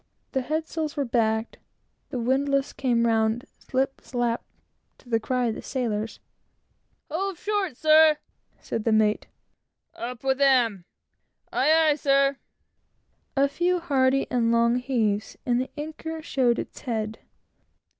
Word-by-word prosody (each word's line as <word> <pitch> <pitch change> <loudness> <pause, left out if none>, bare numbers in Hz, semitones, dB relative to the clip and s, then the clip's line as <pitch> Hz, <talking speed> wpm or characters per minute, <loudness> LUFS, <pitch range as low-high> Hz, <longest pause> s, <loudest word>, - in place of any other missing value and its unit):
The 265 - 0
head 310 +5 -2
sails 315 -2 -4
were 285 - +1
backed, 225 -2 0 0.5
the 265 - -4
windlass 275 +3 +1
came 245 -4 +1
round 225 +1 +1
"slip 270 +1 -2
slap" 240 -2 -1 0.6
to 245 - -19
the 225 -1 +2
cry 250 +2 0
of - - -1
the - - -7
sailors; 225 -4 -3 0.9
"Hove 380 +3 -2
short, 400 - -2
sir," 310 0 +6 0.4
said 225 - -4
the 225 - +1
mate; 215 -1 +2 0.7
"Up 240 +1 -6
with 265 0 +1
him!" 240 -9 +3 0.7
"Aye, 315 +3 +4
aye, - - +2
sir." 275 -1 +3 1.0
A 275 +1 +5
few 355 +5 0
hearty 270 -4 +2
and 235 -2 +2
long 235 +1 +3
heaves, 225 -5 -1
and 245 0 +2
the 260 - -4
anchor 315 +1 -6
showed 250 -6 +2
its - - -6
head. 220 -3 -3
260 Hz, 135 wpm, -25 LUFS, 230-295 Hz, 1.0 s, sir